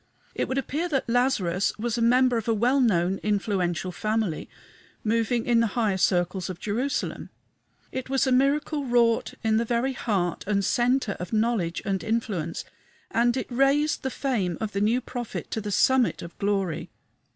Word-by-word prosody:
It -, -, -1 dB
would 260 Hz, -, -2 dB
appear 300 Hz, +6 st, -2 dB
that 270 Hz, -5 st, 0 dB
Lazarus 220 Hz, -7 st, +1 dB
was 230 Hz, +1 st, -2 dB
a 235 Hz, -, -1 dB
member 250 Hz, +2 st, +4 dB
of 225 Hz, -1 st, -2 dB
a 225 Hz, -, +2 dB
well 245 Hz, +6 st, +2 dB
known, 190 Hz, -5 st, +2 dB
influential 190 Hz, -4 st, -1 dB
family, 215 Hz, -3 st, -2 dB, 0.5 s
moving 230 Hz, +1 st, +1 dB
in 235 Hz, -1 st, +3 dB
the 230 Hz, -, +3 dB
higher 215 Hz, -5 st, +2 dB
circles 180 Hz, 0 st, +1 dB
of 180 Hz, -2 st, -6 dB
Jerusalem. 245 Hz, +7 st, -2 dB, 0.6 s
It 260 Hz, 0 st, -5 dB
was 270 Hz, 0 st, +2 dB
a 260 Hz, -, +1 dB
miracle 285 Hz, +3 st, +2 dB
wrought 240 Hz, -3 st, +2 dB
in 220 Hz, -1 st, +2 dB
the 230 Hz, -, +2 dB
very 240 Hz, +3 st, 0 dB
heart 190 Hz, -8 st, -1 dB
and 200 Hz, -2 st, +1 dB
centre 245 Hz, -2 st, +1 dB
of 180 Hz, +5 st, -6 dB
knowledge 215 Hz, -6 st, 0 dB
and 190 Hz, -4 st, -1 dB
influence, 205 Hz, -7 st, -2 dB, 0.5 s
and 240 Hz, +2 st, +2 dB
it 260 Hz, -, -4 dB
raised 275 Hz, +4 st, +2 dB
the 265 Hz, -, -2 dB
fame 220 Hz, -, -1 dB
of 220 Hz, -2 st, -3 dB
the 200 Hz, -, -2 dB
new 230 Hz, +4 st, +2 dB
prophet 245 Hz, -2 st, -6 dB
to 220 Hz, -, -2 dB
the 210 Hz, -, -5 dB
summit 260 Hz, +5 st, +3 dB
of 170 Hz, 0 st, -10 dB
glory. 195 Hz, -5 st, -1 dB
225 Hz, 175 wpm, -26 LUFS, 195-250 Hz, 0.6 s, member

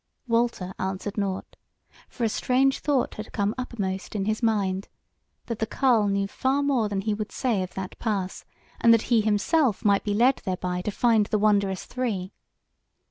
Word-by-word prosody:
Walter 230 Hz, -6 st, 0 dB
answered 190 Hz, +2 st, -3 dB
nought: 195 Hz, -2 st, -3 dB, 0.5 s
for 240 Hz, -, -5 dB
a 225 Hz, -, +3 dB
strange 265 Hz, +4 st, +2 dB
thought 285 Hz, -4 st, 0 dB
had 215 Hz, +1 st, -8 dB
come 205 Hz, 0 st, 0 dB
uppermost 205 Hz, -7 st, -4 dB
in 195 Hz, -2 st, -1 dB
his 215 Hz, +2 st, -1 dB
mind, 200 Hz, -4 st, 0 dB, 0.6 s
that 230 Hz, -2 st, -4 dB
the 220 Hz, -, 0 dB
carle 235 Hz, -6 st, +3 dB
knew 200 Hz, 0 st, +1 dB
far 265 Hz, +7 st, 0 dB
more 255 Hz, -7 st, +1 dB
than 200 Hz, -1 st, -1 dB
he 215 Hz, +1 st, -1 dB
would 210 Hz, 0 st, -4 dB
say 230 Hz, -7 st, 0 dB
of 185 Hz, -, -6 dB
that 190 Hz, -1 st, -6 dB
pass, 200 Hz, -5 st, -2 dB, 0.4 s
and 230 Hz, -, +6 dB
that 225 Hz, -, 0 dB
he 225 Hz, -, +5 dB
himself 215 Hz, -, +1 dB
might 200 Hz, -1 st, +4 dB
be 205 Hz, -1 st, -1 dB
led 250 Hz, +5 st, +4 dB
thereby 180 Hz, -1 st, -3 dB
to 195 Hz, -, -3 dB
find 220 Hz, -1 st, +3 dB
the 215 Hz, -, +1 dB
wondrous 200 Hz, -3 st, +2 dB
three. 210 Hz, -7 st, -3 dB
210 Hz, 180 wpm, -26 LUFS, 195-235 Hz, 0.6 s, and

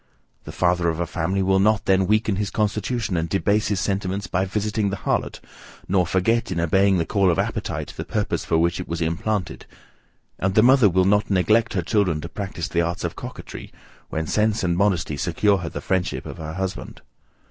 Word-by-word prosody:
The -, -, -7 dB
father 90 Hz, -1 st, +1 dB
of 80 Hz, 0 st, -3 dB
a 85 Hz, -, 0 dB
family 90 Hz, +4 st, -1 dB
will 95 Hz, 0 st, +3 dB
not 105 Hz, +1 st, +2 dB
then 95 Hz, -1 st, +3 dB
weaken 110 Hz, -2 st, +1 dB
his 105 Hz, -1 st, -1 dB
constitution 105 Hz, 0 st, -1 dB
and 80 Hz, 0 st, -1 dB
debase 100 Hz, +4 st, +1 dB
his 100 Hz, -2 st, 0 dB
sentiments, 100 Hz, 0 st, -2 dB
by 95 Hz, +1 st, 0 dB
visiting 105 Hz, +1 st, -1 dB
the 100 Hz, -, -3 dB
harlot, -, -, -2 dB, 0.5 s
nor 90 Hz, -2 st, +2 dB
forget, 95 Hz, +4 st, +1 dB
in 90 Hz, -, -1 dB
obeying 95 Hz, +3 st, +3 dB
the 85 Hz, -, 0 dB
call 100 Hz, +2 st, +2 dB
of 85 Hz, -, +1 dB
appetite, -, -, -3 dB
the -, -, -4 dB
purpose -, -, -2 dB
for 80 Hz, -, +1 dB
which 85 Hz, +2 st, +1 dB
it 90 Hz, -, -5 dB
was 85 Hz, 0 st, -3 dB
implanted; 85 Hz, +3 st, -2 dB, 0.7 s
and 95 Hz, +1 st, 0 dB
the 110 Hz, -, +6 dB
mother 130 Hz, -4 st, +6 dB
will 95 Hz, +1 st, +2 dB
not 105 Hz, +2 st, +2 dB
neglect 110 Hz, +4 st, +2 dB
her 90 Hz, -, -1 dB
children 90 Hz, -5 st, +1 dB
to 85 Hz, -, -7 dB
practise 95 Hz, -4 st, -5 dB
the 85 Hz, -, 0 dB
arts 85 Hz, +1 st, -2 dB
of -, -, -3 dB
coquetry, -, -, -9 dB, 0.4 s
when 80 Hz, 0 st, -2 dB
sense 105 Hz, +4 st, +1 dB
and 85 Hz, -1 st, +1 dB
modesty 90 Hz, -6 st, +1 dB
secure 95 Hz, +5 st, +1 dB
her 85 Hz, -2 st, -4 dB
the -, -, -6 dB
friendship 95 Hz, -1 st, -1 dB
of -, -, -8 dB
her 80 Hz, 0 st, -6 dB
husband. 95 Hz, +1 st, -5 dB
95 Hz, 200 wpm, -23 LUFS, 85-105 Hz, 0.7 s, the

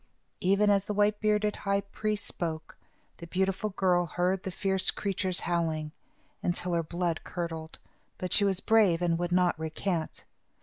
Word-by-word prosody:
Even 200 Hz, +3 st, +3 dB
as 200 Hz, -1 st, +2 dB
the 210 Hz, -, -3 dB
white 205 Hz, 0 st, +3 dB
bearded 210 Hz, -1 st, +1 dB
high 200 Hz, 0 st, 0 dB
priest 210 Hz, +1 st, -2 dB
spoke, 160 Hz, -2 st, -4 dB, 0.4 s
the 170 Hz, -, -9 dB
beautiful 190 Hz, +3 st, 0 dB
girl 180 Hz, -3 st, +2 dB
heard 180 Hz, +3 st, 0 dB
the 190 Hz, -, -4 dB
fierce 190 Hz, 0 st, +1 dB
creatures 190 Hz, -2 st, 0 dB
howling, 160 Hz, -3 st, -1 dB, 0.5 s
until 175 Hz, 0 st, -1 dB
her 170 Hz, -, +2 dB
blood 170 Hz, 0 st, -2 dB
curdled, 165 Hz, -2 st, -5 dB, 0.4 s
but 185 Hz, -, -3 dB
she 205 Hz, -, +4 dB
was 195 Hz, -1 st, +1 dB
brave 200 Hz, -6 st, +4 dB
and 170 Hz, -1 st, +1 dB
would 175 Hz, 0 st, -2 dB
not 180 Hz, -2 st, +2 dB
recant. 160 Hz, +1 st, -3 dB
185 Hz, 160 wpm, -29 LUFS, 170-200 Hz, 0.5 s, she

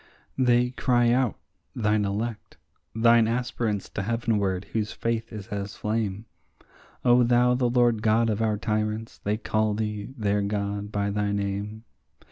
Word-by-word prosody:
They 125 Hz, -1 st, +3 dB
cry 120 Hz, -2 st, +2 dB
out, 125 Hz, -2 st, +1 dB, 0.4 s
thine 105 Hz, -2 st, +1 dB
elect, 105 Hz, +3 st, -4 dB, 0.4 s
thine 115 Hz, 0 st, +5 dB
aspirants 115 Hz, -3 st, -1 dB
to -, -, -4 dB
heavenward, 105 Hz, -4 st, 0 dB
whose 110 Hz, -2 st, -1 dB
faith 115 Hz, 0 st, -2 dB
is 105 Hz, -3 st, -8 dB
as 100 Hz, -1 st, -4 dB
flame; 105 Hz, -1 st, -2 dB, 0.8 s
O 125 Hz, 0 st, +6 dB
thou 120 Hz, +1 st, +4 dB
the 125 Hz, -1 st, +1 dB
Lord 120 Hz, -2 st, +3 dB
God 115 Hz, +1 st, +3 dB
of 110 Hz, 0 st, -1 dB
our 110 Hz, -2 st, +1 dB
tyrants, 110 Hz, +1 st, -2 dB
they 105 Hz, +1 st, -1 dB
call 110 Hz, -1 st, 0 dB
thee, 105 Hz, 0 st, -3 dB
their 105 Hz, -2 st, +1 dB
God, 100 Hz, 0 st, -2 dB
by 100 Hz, -1 st, -1 dB
thy 105 Hz, 0 st, 0 dB
name. 100 Hz, +2 st, -3 dB
110 Hz, 145 wpm, -26 LUFS, 105-115 Hz, 0.8 s, O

